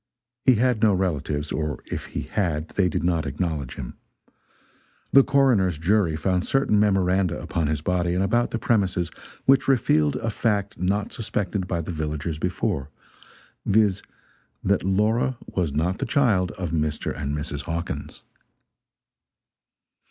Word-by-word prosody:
He 130 Hz, -, +6 dB
had 120 Hz, -1 st, +1 dB
no 105 Hz, -3 st, +4 dB
relatives 75 Hz, -5 st, -2 dB
or 75 Hz, -1 st, -3 dB
if -, -, -5 dB
he -, -, -5 dB
had 85 Hz, -6 st, -2 dB
they 95 Hz, -3 st, +1 dB
did 80 Hz, -, -2 dB
not 85 Hz, -3 st, +1 dB
acknowledge 75 Hz, -2 st, -3 dB
him. 65 Hz, -3 st, -7 dB, 1.2 s
The 135 Hz, -, +8 dB
coroner's 120 Hz, -, +3 dB
jury 85 Hz, 0 st, +2 dB
found 90 Hz, +3 st, 0 dB
certain 135 Hz, -6 st, +2 dB
memoranda 95 Hz, -3 st, +2 dB
upon 80 Hz, -3 st, -2 dB
his 75 Hz, -1 st, -1 dB
body 90 Hz, +1 st, 0 dB
and 95 Hz, -, +1 dB
about 120 Hz, +5 st, +1 dB
the -, -, -2 dB
premises 95 Hz, -7 st, 0 dB, 0.3 s
which 135 Hz, 0 st, +4 dB
revealed 80 Hz, -, +3 dB
a 115 Hz, -, -2 dB
fact 105 Hz, -4 st, -1 dB
not 100 Hz, +3 st, -1 dB
suspected 100 Hz, -4 st, -2 dB
by 85 Hz, -2 st, -1 dB
the 80 Hz, -, -5 dB
villagers 75 Hz, -1 st, -3 dB
before 80 Hz, -5 st, -2 dB, 0.7 s
viz., 100 Hz, -2 st, +3 dB, 0.6 s
that 100 Hz, 0 st, +2 dB
Laura 110 Hz, +7 st, +1 dB
was 85 Hz, -6 st, -2 dB
not 85 Hz, +7 st, -1 dB
the 135 Hz, -, -2 dB
child 110 Hz, -9 st, +2 dB
of 90 Hz, -6 st, -4 dB
Mr. 75 Hz, -2 st, -1 dB
and 70 Hz, 0 st, -3 dB
Mrs. 75 Hz, -2 st, -5 dB
Hawkins. 85 Hz, 0 st, -5 dB
90 Hz, 145 wpm, -24 LUFS, 80-105 Hz, 1.2 s, The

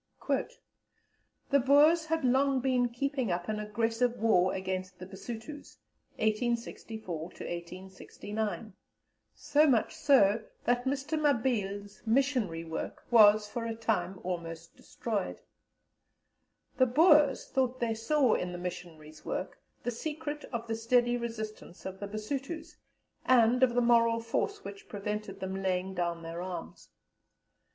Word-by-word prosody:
"The 280 Hz, -, +5 dB
Boers 295 Hz, +5 st, +5 dB
had 325 Hz, -3 st, 0 dB
long 265 Hz, +2 st, +3 dB
been 250 Hz, -1 st, +1 dB
keeping 260 Hz, -2 st, -2 dB
up 175 Hz, 0 st, -2 dB
an 215 Hz, -1 st, -2 dB
aggressive 225 Hz, +3 st, 0 dB
war 185 Hz, -5 st, +3 dB
against 185 Hz, -1 st, -4 dB
the 185 Hz, -, -8 dB
Basutos 225 Hz, +9 st, -9 dB, 0.4 s
(1864 220 Hz, -4 st, -2 dB
to -, -, -5 dB, 0.2 s
1869), 190 Hz, +3 st, -5 dB, 0.6 s
so 295 Hz, +1 st, +3 dB
much 260 Hz, +3 st, +2 dB
so 235 Hz, -9 st, +4 dB, 0.2 s
that 245 Hz, +1 st, +1 dB
Mr. 280 Hz, +3 st, -1 dB
Mabille's 210 Hz, -8 st, 0 dB
missionary 230 Hz, -9 st, +1 dB
work 160 Hz, -1 st, -6 dB
was 215 Hz, -2 st, +7 dB
for 230 Hz, +2 st, -4 dB
a 225 Hz, -, -3 dB
time 195 Hz, -5 st, -1 dB
almost 170 Hz, -2 st, -5 dB
destroyed. 210 Hz, -5 st, -4 dB, 1.4 s
The 255 Hz, -, +5 dB
Boers 295 Hz, 0 st, +5 dB
thought 255 Hz, -1 st, 0 dB
they 235 Hz, -2 st, 0 dB
saw 245 Hz, +3 st, +2 dB
in 180 Hz, 0 st, -1 dB
the -, -, -5 dB
missionaries' 170 Hz, -3 st, -8 dB
work -, -, -4 dB, 0.2 s
the 245 Hz, -, -1 dB
secret 295 Hz, +3 st, -5 dB
of 235 Hz, -2 st, -5 dB
the 225 Hz, -, -3 dB
steady 240 Hz, +2 st, +2 dB
resistance 220 Hz, -6 st, -6 dB
of 190 Hz, 0 st, -6 dB
the 200 Hz, -, -5 dB
Basutos, 265 Hz, +10 st, -5 dB, 0.5 s
and 250 Hz, 0 st, +4 dB
of 250 Hz, -2 st, +4 dB
the 245 Hz, -, +4 dB
moral 230 Hz, -1 st, +4 dB
force 405 Hz, -, -2 dB
which 200 Hz, 0 st, -9 dB
prevented 210 Hz, -1 st, -4 dB
them 190 Hz, 0 st, -3 dB
laying 190 Hz, 0 st, -1 dB
down 170 Hz, -2 st, -2 dB
their 165 Hz, +1 st, -5 dB
arms. 180 Hz, -, -7 dB
225 Hz, 130 wpm, -30 LUFS, 190-255 Hz, 1.4 s, was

